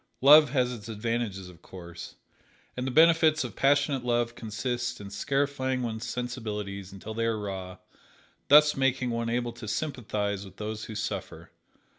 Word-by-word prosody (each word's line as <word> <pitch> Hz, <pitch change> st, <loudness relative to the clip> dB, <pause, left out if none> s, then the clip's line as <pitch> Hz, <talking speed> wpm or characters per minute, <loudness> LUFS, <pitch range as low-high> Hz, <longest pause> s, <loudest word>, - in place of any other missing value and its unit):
Love 150 Hz, +2 st, +8 dB
has 125 Hz, -2 st, +1 dB
its 110 Hz, -2 st, -9 dB
advantages, 110 Hz, -3 st, -3 dB
of 90 Hz, -2 st, -15 dB
course, 85 Hz, -1 st, -10 dB, 0.6 s
and 125 Hz, +1 st, -3 dB
the -, -, 0 dB
benefits 160 Hz, +2 st, +5 dB
of -, -, -7 dB
passionate 140 Hz, -1 st, +2 dB
love 120 Hz, -1 st, 0 dB
consist 120 Hz, +3 st, -3 dB
in 100 Hz, -1 st, -9 dB
scarifying 130 Hz, +3 st, -1 dB
one's 115 Hz, -1 st, -4 dB
sensibilities 105 Hz, -6 st, -5 dB
until 100 Hz, +3 st, -8 dB
they 115 Hz, +1 st, -1 dB
are 115 Hz, -1 st, 0 dB
raw, 95 Hz, -3 st, -6 dB, 0.7 s
thus 150 Hz, +1 st, +7 dB
making 135 Hz, -2 st, +1 dB
one 115 Hz, 0 st, -2 dB
able 120 Hz, 0 st, -1 dB
to 115 Hz, -1 st, -10 dB
sympathize 105 Hz, -7 st, -2 dB
with 95 Hz, -, -13 dB
those 110 Hz, 0 st, -5 dB
who 110 Hz, -, -8 dB
suffer. 105 Hz, -, -5 dB
120 Hz, 155 wpm, -28 LUFS, 105-130 Hz, 0.7 s, Love